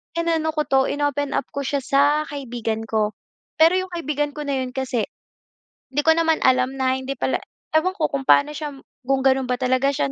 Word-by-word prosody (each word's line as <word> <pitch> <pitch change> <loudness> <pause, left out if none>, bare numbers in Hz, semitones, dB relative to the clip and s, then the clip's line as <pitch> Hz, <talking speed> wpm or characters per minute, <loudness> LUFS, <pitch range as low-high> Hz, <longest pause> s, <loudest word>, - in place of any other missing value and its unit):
inano 325 -2 0
ko 300 - +1
'to 270 -2 +2
in-open 290 -1 -1
up - - +1
ko 280 -1 -4
siya 280 -2 -1
sa 275 +1 +3 0.3
kaibigan 230 -5 -4
ko 215 -1 0 0.5
pero 330 +3 +6
yung 370 0 -2
kaibigan 295 -3 -2
ko 295 0 -6
na 280 - 0
yun 250 - -6
kasi 255 -3 -1 0.8
di 290 +2 0
ko 320 - +5
naman 325 -1 +2
alam 255 0 +3
na 260 0 +1
hindi 265 +1 -4
pala 260 - 0 0.4
ewan 370 +4 +1
ko 310 - 0
kung 275 -1 -3
paano 290 +1 +5
siya 295 -2 -5 0.3
kung 270 -1 +2
gano'n 265 -1 +3
ba 250 - +1
talaga 255 +2 +1
siya 140 - -1
275 Hz, 200 wpm, -22 LUFS, 260-300 Hz, 0.8 s, pero